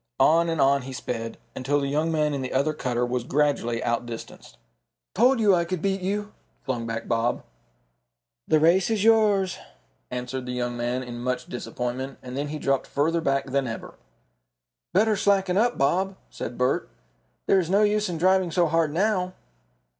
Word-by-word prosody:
On 165 +5 +4
and 165 -2 -1
on 140 0 +4
he 130 +1 -8
sped, 115 -2 -4 0.2
until 140 +3 0
the 140 - -1
young 155 +4 0
man 150 -2 +1
in 140 - -2
the 130 - -4
other 140 +4 +1
cutter 125 -4 -1
was 125 0 -2
gradually 135 -4 0
outdistanced. 120 -1 -5 0.6
"Told 250 +4 +4
you 210 -3 +5
I 175 -1 +3
could 180 +1 -3
beat 195 +2 -1
you!" 205 +3 -2 0.3
flung 125 -3 -3
back 115 0 -4
Bob. 115 +1 0 1.0
"The 155 - +4
race 175 +5 +4
is 215 -3 0
yours," 210 -5 +3 0.5
answered 125 +1 -4
the 125 - -3
young 120 -1 -2
man, 120 +2 -2
in 120 -1 -7
much 125 +1 -2
disappointment, 125 +2 -4
and 125 0 -7
then 145 +2 -2
he 155 +1 -4
dropped 135 -2 0
further 165 +4 0
back 135 -3 0
than 135 -1 +1
ever. 115 - -6 1.0
"Better 215 +4 +3
slacken 195 -2 +2
up, 240 +4 +2
Bob," 185 +8 +1 0.2
said 120 - -6
Bert. 125 0 0 0.6
"There 195 - +4
is 175 -3 -2
no 200 +3 +4
use 210 -1 +2
in 170 - -3
driving 185 +1 +3
so 175 +1 +2
hard 165 -1 +1
now." 185 +1 0
150 Hz, 175 wpm, -25 LUFS, 125-185 Hz, 1.0 s, you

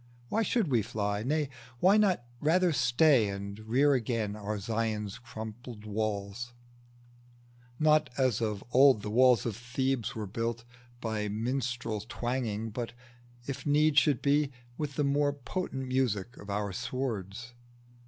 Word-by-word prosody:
Why 225 - +1
should 225 -2 +1
we 120 -4 +3
fly? 105 -1 -2
Nay, 150 +5 0 0.3
why 190 +7 +6
not 195 - +3 0.2
rather 170 +3 +3
stay 125 -2 +4
And 100 +1 -5
rear 130 +7 +3
again 115 -4 -1
our 105 0 -3
Zion's 110 0 -2
crumbled 110 -1 -8
walls, 105 +2 -3 1.2
Not, 155 -1 +4
as 130 -5 +2
of 105 -3 -2
old 130 -4 +6
the 105 - -4
walls 125 -1 +5
of 115 -4 -2
Thebes 125 +1 -2
were 110 -2 -3
built, 115 +3 -3 0.4
By 110 -2 -2
minstrel 115 0 -2
twanging, 115 -3 -2
but, 115 +1 -4 0.5
if 140 - -5
need 150 0 +5
should 145 -5 +1
be, 145 0 +3 0.2
With 145 -1 -4
the 150 - +1
more 145 0 +2
potent 135 -1 -4
music 125 -4 0
of 100 - -11
our 100 -1 -2
swords? 115 -1 -4
120 Hz, 140 wpm, -30 LUFS, 105-140 Hz, 1.2 s, why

